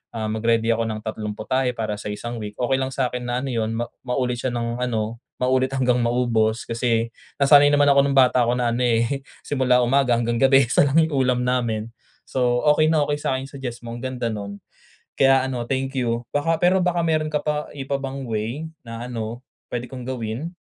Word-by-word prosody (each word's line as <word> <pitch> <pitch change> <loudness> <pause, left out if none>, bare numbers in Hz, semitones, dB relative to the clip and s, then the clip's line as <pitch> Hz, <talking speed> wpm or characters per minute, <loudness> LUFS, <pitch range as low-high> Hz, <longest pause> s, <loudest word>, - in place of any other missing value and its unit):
ah, 110 -1 -2
mag-ready 115 +1 +1
ako 115 0 0
ng 110 -1 -3
tatlong 105 -1 -4
putahe 125 +3 -1
para 110 -2 -2
sa - - -7
isang 120 +3 -5
week. 105 0 -6
Okey 130 +2 +1
lang 130 - -1
sa'kin 125 -2 -2
na 120 +1 -1
ano 135 - -3
'yun 115 -1 -1
ma 120 - 0 0.2
maulit 125 -1 -1
siya 130 - 0
ng 120 +1 -2
ano 115 -2 -2 0.2
maulit 130 +1 +2
hanggang 125 -2 +2
maubos. 120 -2 +1
Kasi 115 -1 0 0.3
nasanay 145 +1 +7
naman 145 0 +4
ako 140 - +5
nung 140 - 0
bata 125 -1 +5
ako 120 - +2
na 120 -1 +1
ano, 120 - -2
eh, 120 +3 +1 0.2
simula 125 -3 +2
umaga 125 0 +3
hanggang 115 0 0
gabi 135 +1 +6
1 140 +4 +3
lang 140 - +1
yung 160 -1 -2
ulam 125 -1 +1
namin, 115 -3 -1 0.3
so 125 -2 0
okey 155 +1 +3
na 155 -2 +3
okey 145 0 -1
sa'kin 130 -2 -1
yung - - -17
suggest 120 -3 -6
mo 115 - -6
ang 120 - -7
ganda 125 -3 -2
no'n. 100 -1 -6 0.6
Kaya 135 -1 +5
ano 125 -3 -3
thank 135 0 -2
you. 120 -1 0
Baka 160 +3 +1
pero 180 +2 +4
baka 175 -1 +1
mayro'n 155 -1 +1
ka 150 - 0
pa 150 0 -2
iba 140 0 -3
pang 135 0 -5
way 115 +8 -3 0.2
na 115 0 -6
ano 115 +1 -5 0.3
puwede 120 0 -4
kong 125 -2 -8
gawin? 130 +7 -4
125 Hz, 210 wpm, -23 LUFS, 115-135 Hz, 0.6 s, nasanay